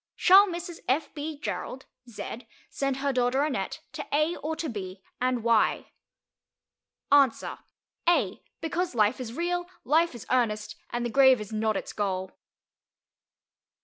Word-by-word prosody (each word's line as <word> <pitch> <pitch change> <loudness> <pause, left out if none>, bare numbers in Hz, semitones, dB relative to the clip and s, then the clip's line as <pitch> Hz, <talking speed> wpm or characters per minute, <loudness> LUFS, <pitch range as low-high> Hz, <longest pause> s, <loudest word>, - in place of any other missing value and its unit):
Shall 390 +3 +7
Mrs. 345 -1 -6
F. 275 +5 0
B. 300 0 -5
Gerald 265 -2 -5 0.2
(Z) 235 +2 -7 0.2
send 275 -1 -1
her 275 0 0
daughter 255 +2 +2
Annette 300 -3 -2
to - - -6
A 305 +4 +2
or 315 +2 -3
to 320 - -3
B, 190 -5 -6 0.2
and 250 -2 +1
why? 230 -2 +2 1.2
Answer: 280 -4 +3 0.5
A, 345 - +1 0.2
because 335 -1 -2
life 215 +2 +3
is 230 -2 -6
real, 350 +3 -1 0.2
life 320 +1 +2
is 235 - -9
earnest, 220 -4 0
and 240 0 -2
the 240 - -2
grave 265 -2 +6
is 210 +1 -7
not 215 -1 +1
its - - -6
goal. 190 -2 -2
260 Hz, 145 wpm, -27 LUFS, 225-315 Hz, 1.2 s, Shall